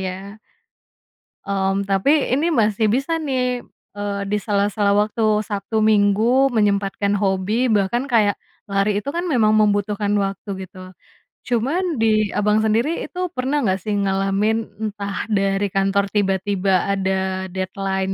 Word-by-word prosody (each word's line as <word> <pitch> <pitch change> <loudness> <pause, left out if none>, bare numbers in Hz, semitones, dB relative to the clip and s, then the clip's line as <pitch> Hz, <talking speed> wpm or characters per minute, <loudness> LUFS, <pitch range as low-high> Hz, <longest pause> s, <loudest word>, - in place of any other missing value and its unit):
ya. 190 +2 -6 1.1
Mmm, 195 0 -1
tapi 270 +10 +2
ini 305 +7 +1
masih 220 -3 +2
bisa 270 +10 0
nih, 250 -5 -2 0.3
eee, 205 -1 -3
di 210 - +1
sela-sela 205 0 +1
waktu 215 +1 +1
Sabtu, 215 +1 -3
Minggu 220 +5 +3
menyempatkan 200 -1 +1
hobi 195 +4 0
bahkan 225 +3 +1
kayak 215 -6 +2 0.3
lari 200 +1 +1
itu 280 - -5
kan 345 +5 -3
memang 220 -10 +3
membutuhkan 205 0 +1
waktu 195 +1 -4 0.2
gitu. 185 0 -12 0.5
Cuman 285 +8 0
di 215 -2 +2
Abang, 210 +1 +2
sendiri 235 +10 +1
itu 365 0 -4
pernah 270 +2 -1
nggak 190 -1 +1
sih 210 +1 -3
ngalamin 195 +2 +1 0.2
entah 200 -2 -4
dari 195 -1 +1
kantor 195 +1 +1
tiba-tiba 195 -1 +1
ada 190 -1 -2
deadline 190 +1 -3
205 Hz, 130 wpm, -21 LUFS, 195-225 Hz, 1.1 s, Minggu